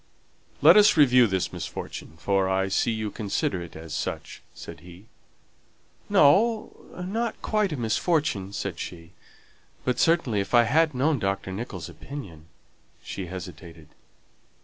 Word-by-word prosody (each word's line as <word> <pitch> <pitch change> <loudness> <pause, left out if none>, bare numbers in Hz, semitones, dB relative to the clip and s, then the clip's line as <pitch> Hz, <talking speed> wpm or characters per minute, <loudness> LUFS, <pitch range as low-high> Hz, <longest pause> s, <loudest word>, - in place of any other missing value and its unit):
"Let - - +9
us 210 -3 +6
review 125 -5 +6
this 95 -3 -2
misfortune, 80 - -7
for 95 +2 +1
I 95 0 +1
see 100 - +1
you 110 -2 -2
consider 100 -3 -2
it 85 - -10
as 80 -1 -8
such," - - -5
said - - -10
he. 90 +4 -14 1.0
"No, 215 +10 +4 0.3
not 225 +4 -2
quite 210 -3 +1
a 150 - -3
misfortune," 115 - 0
said - - -4
she. 85 -1 -8 0.7
"But, 125 -1 0
certainly, 160 -11 +2
if 100 +5 -1
I 120 - +7
had 155 +5 +2
known 140 +2 +1
Dr. 95 -1 -2
Nicholls' 110 +6 -6
opinion 90 - -10 0.3
" - - -36
she 95 -2 -6
hesitated. 85 -3 -9
110 Hz, 140 wpm, -26 LUFS, 95-150 Hz, 1.0 s, Let